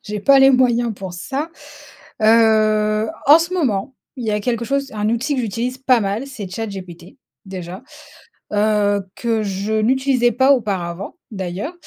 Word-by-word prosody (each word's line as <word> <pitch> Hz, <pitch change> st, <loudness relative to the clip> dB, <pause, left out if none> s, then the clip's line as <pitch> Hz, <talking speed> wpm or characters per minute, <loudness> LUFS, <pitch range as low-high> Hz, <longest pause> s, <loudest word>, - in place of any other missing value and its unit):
j'ai 210 Hz, 0 st, -5 dB
pas 275 Hz, +6 st, +5 dB
les 270 Hz, 0 st, +7 dB
moyens 240 Hz, -3 st, +2 dB
pour 190 Hz, -2 st, -7 dB
ça, 280 Hz, -, -4 dB, 0.7 s
heu, 215 Hz, -1 st, +3 dB, 0.2 s
en 295 Hz, +3 st, +8 dB
ce 340 Hz, +2 st, -3 dB
moment, 260 Hz, -, -1 dB, 0.2 s
il 250 Hz, -, -6 dB
y -, -, +1 dB
a 210 Hz, -, 0 dB
quelque 235 Hz, +2 st, -2 dB
chose 275 Hz, +2 st, -2 dB
un 210 Hz, 0 st, -1 dB
outil 240 Hz, +6 st, -1 dB
que -, -, 0 dB
j'utilise 240 Hz, +4 st, -3 dB
pas 260 Hz, -2 st, +3 dB
mal, 205 Hz, +5 st, -2 dB
c'est 215 Hz, -8 st, -7 dB
ChatGPT, 185 Hz, -4 st, -8 dB, 0.3 s
déjà, 185 Hz, +1 st, -7 dB, 0.7 s
heu, 205 Hz, -1 st, +2 dB
que 230 Hz, -2 st, -1 dB
je 200 Hz, +1 st, -3 dB
n'utilisais 250 Hz, +2 st, +2 dB
pas 265 Hz, +3 st, +4 dB
auparavant 195 Hz, -, -3 dB, 0.2 s
d'ailleurs. 190 Hz, -, -5 dB
220 Hz, 155 wpm, -19 LUFS, 200-255 Hz, 0.7 s, en